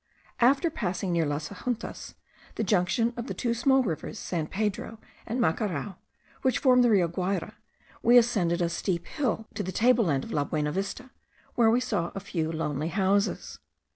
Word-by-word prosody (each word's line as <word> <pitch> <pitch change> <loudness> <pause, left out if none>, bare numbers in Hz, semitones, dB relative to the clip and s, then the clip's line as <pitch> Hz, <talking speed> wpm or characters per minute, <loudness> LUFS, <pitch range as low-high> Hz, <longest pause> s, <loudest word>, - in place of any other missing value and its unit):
After 275 +7 +4
passing, 190 -6 -2
near 165 -3 +1
Las 145 +1 -3
Ajuntas, 245 -2 -5 0.4
the - - -1
junction 215 +4 +1
of 235 +1 -5
the - - -4
two 235 -2 0
small 265 +3 +3
rivers 180 +1 -4
San 165 -6 -3
Pedro 210 +3 -3 0.3
and 235 +3 -2
Macarao, 190 - -1 0.4
which 260 - +2
form 250 -2 +5
the 240 - +4
Rio 190 -6 +4
Guayra, 185 +3 -2 0.5
we 240 +1 +6
ascended 185 -8 +3
a 170 - +1
steep 170 0 -2
hill 245 -6 -2
to - - -3
the 185 -1 -3
table 235 +2 +3
land 140 -5 +1
of - - -8
La 145 - +1
Buenavista, 190 - -3 0.4
where 230 -2 +4
we 235 +2 +4
saw 205 -9 -1
a - - -2
few 165 -4 -3
lonely 155 -2 -2
houses. 190 - 0
200 Hz, 170 wpm, -27 LUFS, 170-235 Hz, 0.5 s, we